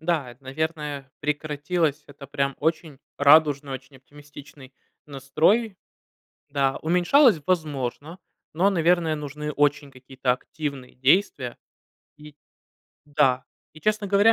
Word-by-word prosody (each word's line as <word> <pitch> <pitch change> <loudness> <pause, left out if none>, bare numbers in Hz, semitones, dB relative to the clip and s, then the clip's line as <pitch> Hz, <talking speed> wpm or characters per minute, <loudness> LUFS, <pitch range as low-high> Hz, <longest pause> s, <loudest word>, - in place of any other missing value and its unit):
Да, 160 -6 -1
это, 125 +3 -18
наверное, 150 -1 -4
прекратилось. 150 +1 -1
Это 140 -1 -12
прям 140 0 -2
очень 155 -2 -2 0.2
радужный, 145 -1 +4
очень 135 +1 -9
оптимистичный 145 0 -15 0.3
настрой. 160 - +1 0.7
Да, 135 -1 0
уменьшалось- 180 - +4
возможно, 155 -1 -2 0.3
но, 180 +6 +3
наверное, 170 -3 +2
нужны 150 0 -5
очень 145 -1 0
какие-то 130 -1 -3
активные 140 0 -5
действия. 130 -2 +1 0.6
И 150 -1 -14 0.7
да, 140 -3 +1 0.3
и, 155 - -15
честно 215 +2 0
говоря, 205 +3 +5
150 Hz, 110 wpm, -24 LUFS, 135-160 Hz, 0.7 s, говоря